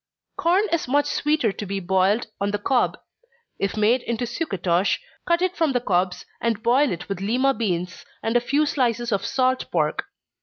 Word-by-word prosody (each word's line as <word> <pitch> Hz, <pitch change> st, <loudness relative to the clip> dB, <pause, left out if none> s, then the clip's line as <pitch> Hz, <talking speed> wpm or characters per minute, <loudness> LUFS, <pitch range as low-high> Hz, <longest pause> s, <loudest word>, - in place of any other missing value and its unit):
_ -, -, -53 dB
Corn 355 Hz, +5 st, +3 dB
is 335 Hz, -5 st, 0 dB
much 285 Hz, +3 st, +2 dB
sweeter 295 Hz, -5 st, +1 dB
to 200 Hz, -, -7 dB
be 195 Hz, +1 st, -2 dB
boiled 190 Hz, +5 st, +2 dB, 0.2 s
on 200 Hz, -, +1 dB
the 205 Hz, -, 0 dB
cob. 245 Hz, +5 st, +1 dB, 0.6 s
If 200 Hz, +2 st, -1 dB
made 225 Hz, +4 st, +3 dB
into 235 Hz, 0 st, -2 dB
sucatosh, 195 Hz, -, 0 dB, 0.3 s
cut 340 Hz, +1 st, +2 dB
it 370 Hz, 0 st, 0 dB
from 320 Hz, -6 st, +1 dB
the 245 Hz, -, +2 dB
cobs, 185 Hz, -5 st, 0 dB, 0.2 s
and 225 Hz, -2 st, -1 dB
boil 260 Hz, +4 st, +3 dB
it 175 Hz, -, -5 dB
with 195 Hz, -2 st, -4 dB
Lima 255 Hz, +7 st, +2 dB
beans, 180 Hz, -6 st, -2 dB, 0.2 s
and 225 Hz, +1 st, -1 dB
a -, -, +6 dB
few 285 Hz, +5 st, +1 dB
slices 240 Hz, -4 st, 0 dB
of 200 Hz, -1 st, 0 dB
salt 255 Hz, +2 st, 0 dB
pork. 155 Hz, -3 st, 0 dB
235 Hz, 190 wpm, -23 LUFS, 195-270 Hz, 0.6 s, a